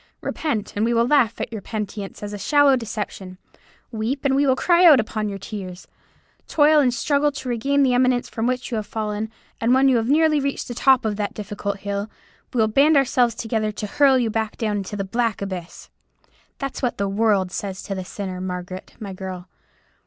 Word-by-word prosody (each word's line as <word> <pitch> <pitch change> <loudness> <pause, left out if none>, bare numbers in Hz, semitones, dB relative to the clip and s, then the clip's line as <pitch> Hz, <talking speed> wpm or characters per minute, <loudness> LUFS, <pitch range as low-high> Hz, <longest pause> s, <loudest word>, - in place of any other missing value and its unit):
Repent, 225 -10 -3
and 205 - 0
we 235 +1 +1
will 230 0 +3
laugh 245 -4 +2
at - - -4
your 215 - -5
penitence 210 -1 -6
as 205 0 -5
a - - -4
shallow 290 +4 +4
deception. 210 -5 -5 0.5
Weep, 235 +5 -3
and 270 -1 +3
we 280 +1 +3
will 260 - +4
cry 345 +5 +3
out 310 -7 +8
upon 215 -1 -2
your 200 - -5
tears. 190 -2 -8 0.6
Toil 305 0 +4
and 260 -4 +3
struggle 285 +3 +1
to 270 - -7
regain 275 +4 +1
the 255 -2 +3
eminence 250 0 +2
from 225 +1 -2
which 255 +1 -2
you 230 - -1
have 210 -1 -4
fallen, 215 -1 -3 0.3
and 235 +3 +3
when 270 +1 +4
you 260 -2 +4
have 230 +1 -1
nearly 310 +1 +4
reached 275 0 -2
the 240 - -5
top 260 0 +3
of 210 -2 -1
that 205 -1 -3
difficult 200 -1 -5
hill, 200 +1 -3 0.4
we - - -5
will 220 - +4
band 280 +7 +4
ourselves 250 -3 +2
together 220 -2 -1
to 210 - -5
hurl 270 +5 +4
you 235 -3 0
back 220 +1 -3
into 205 -2 -2
the 200 - -2
black 230 +2 -1
abyss.' 185 -3 -7 0.7
That's 275 -1 -5
what 250 -3 -1
the 200 - 0
world 200 -2 +1
says 190 0 -5
to 195 - -4
the 190 -1 -4
sinner, 185 -1 -6
Margaret, 185 0 -6
my 200 -3 -6
girl. 185 -1 -7
225 Hz, 205 wpm, -22 LUFS, 200-265 Hz, 0.7 s, out